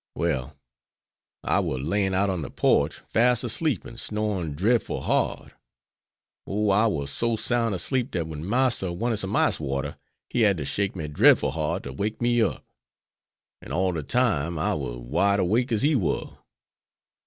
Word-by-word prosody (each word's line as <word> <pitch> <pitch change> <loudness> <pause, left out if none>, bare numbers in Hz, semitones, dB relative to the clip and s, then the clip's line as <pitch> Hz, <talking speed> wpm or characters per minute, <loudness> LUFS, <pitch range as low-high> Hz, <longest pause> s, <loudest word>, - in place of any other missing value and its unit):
Well, 70 -4 -2 0.9
I - - +2
war 65 - -1
laying 95 +8 0
out 100 +1 +2
on 90 -3 -3
de 70 - -5
porch - - +1
fas' 120 +1 +3
asleep 135 +4 0
an' 115 - -10
snorin' 105 -9 -2
drefful 110 +9 0
hard. - - -1 0.9
Oh, 105 +1 +1
I 105 +4 +4
war 70 -10 -2
so 115 +11 0
soun' 115 -1 0
asleep 125 +8 0
dat 85 -3 -2
wen 80 -1 -7
Marster 120 -2 +1
wanted 115 +6 -1
some 100 0 -2
ice - - +2
water 70 -1 -3 0.3
he 120 - -1
had 100 -4 +4
to 70 - -4
shake 100 +4 -1
me 80 -4 -4
drefful 75 - +4
hard 80 +4 -2
to - - -7
wake 105 +2 -3
me 120 0 +2
up. - - -1 1.0
An' - - -10
all 95 +1 +1
de 80 -3 -3
time 85 - 0
I 75 - 0
war 65 -5 -4
wide 100 +12 +1
'wake 115 +8 +1
as 110 +1 +1
he 150 +1 +3
war." 95 - -2
100 Hz, 170 wpm, -25 LUFS, 80-115 Hz, 1.0 s, I